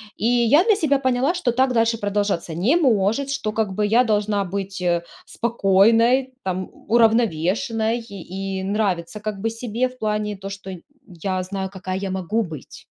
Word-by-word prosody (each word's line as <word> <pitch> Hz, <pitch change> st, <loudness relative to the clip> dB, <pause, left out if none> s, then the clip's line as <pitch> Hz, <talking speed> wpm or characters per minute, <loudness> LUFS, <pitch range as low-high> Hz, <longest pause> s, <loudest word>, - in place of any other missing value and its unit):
И -, -, -4 dB
я 245 Hz, +6 st, +4 dB
для 435 Hz, +1 st, +4 dB
себя 290 Hz, -6 st, +2 dB
поняла, 260 Hz, +4 st, +1 dB
что 300 Hz, -9 st, 0 dB
так 260 Hz, +2 st, +2 dB
дальше 230 Hz, -1 st, +2 dB
продолжаться 205 Hz, -5 st, -1 dB
не 210 Hz, -, +2 dB
может, 250 Hz, -, +2 dB
что, 215 Hz, -6 st, -2 dB
как 210 Hz, -3 st, -1 dB
бы, 210 Hz, -, +1 dB
я 230 Hz, +4 st, +4 dB
должна 210 Hz, -2 st, +1 dB
быть, 195 Hz, 0 st, -5 dB
э, 170 Hz, -1 st, +1 dB, 0.2 s
спокойной, 230 Hz, +4 st, +3 dB
там, 185 Hz, 0 st, -3 dB
у 230 Hz, -, -3 dB
уравновешенной 225 Hz, -, +2 dB
и 195 Hz, -3 st, -6 dB
нравиться, 195 Hz, -2 st, -1 dB
как 210 Hz, -1 st, -4 dB
бы, 225 Hz, +3 st, -1 dB
себе 235 Hz, +2 st, -2 dB
в 255 Hz, 0 st, -18 dB
плане 210 Hz, -1 st, -2 dB
то, 195 Hz, 0 st, -7 dB
что 195 Hz, -1 st, -7 dB
нь 175 Hz, -, -10 dB, 0.3 s
я 185 Hz, +1 st, -3 dB
знаю, 190 Hz, 0 st, -4 dB
какая 185 Hz, -1 st, -5 dB
я 195 Hz, -1 st, -3 dB
могу 190 Hz, +4 st, -1 dB
быть. 160 Hz, -, -8 dB
210 Hz, 175 wpm, -22 LUFS, 190-235 Hz, 0.3 s, я